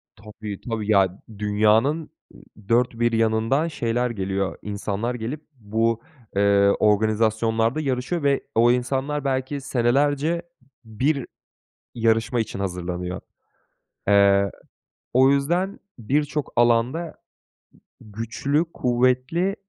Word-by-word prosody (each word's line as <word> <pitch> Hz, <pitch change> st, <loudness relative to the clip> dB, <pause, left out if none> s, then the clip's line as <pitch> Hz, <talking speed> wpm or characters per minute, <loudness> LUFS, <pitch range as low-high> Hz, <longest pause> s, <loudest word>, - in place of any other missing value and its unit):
Tabii, 105 Hz, -2 st, -9 dB
tabii. 110 Hz, -2 st, -2 dB
Ya 95 Hz, -2 st, +2 dB, 0.2 s
dünyanın 110 Hz, +9 st, +2 dB
ı -, -, -17 dB, 0.6 s
dört 120 Hz, 0 st, +2 dB
bir 120 Hz, 0 st, +2 dB
yanından 115 Hz, +6 st, +1 dB
şeyler 125 Hz, -5 st, -1 dB
geliyor. 95 Hz, -3 st, -2 dB
İnsanlar 105 Hz, +3 st, -3 dB
gelip 125 Hz, +6 st, -5 dB, 0.2 s
bu, 115 Hz, +1 st, 0 dB, 0.3 s
eee, 100 Hz, 0 st, +4 dB
organizasyonlarda 110 Hz, +4 st, +2 dB
yarışıyor 135 Hz, +4 st, -2 dB
ve 140 Hz, -1 st, +2 dB
o 120 Hz, +2 st, +5 dB
insanlar 135 Hz, +4 st, -1 dB
belki 135 Hz, +1 st, -1 dB
senelerce 140 Hz, +6 st, +1 dB, 0.4 s
1 130 Hz, +5 st, -1 dB, 0.7 s
yarışma 115 Hz, 0 st, +1 dB
için 110 Hz, -3 st, -4 dB
hazırlanıyor. 90 Hz, -1 st, -4 dB, 0.9 s
Eee, 100 Hz, -1 st, +4 dB, 0.6 s
o 130 Hz, +2 st, +5 dB
yüzden 170 Hz, +8 st, 0 dB, 0.2 s
birçok 145 Hz, +5 st, -1 dB
alanda 120 Hz, +8 st, +2 dB, 0.9 s
güçlü, 115 Hz, +9 st, -2 dB
kuvvetli 130 Hz, +9 st, +1 dB
115 Hz, 100 wpm, -23 LUFS, 105-135 Hz, 0.9 s, o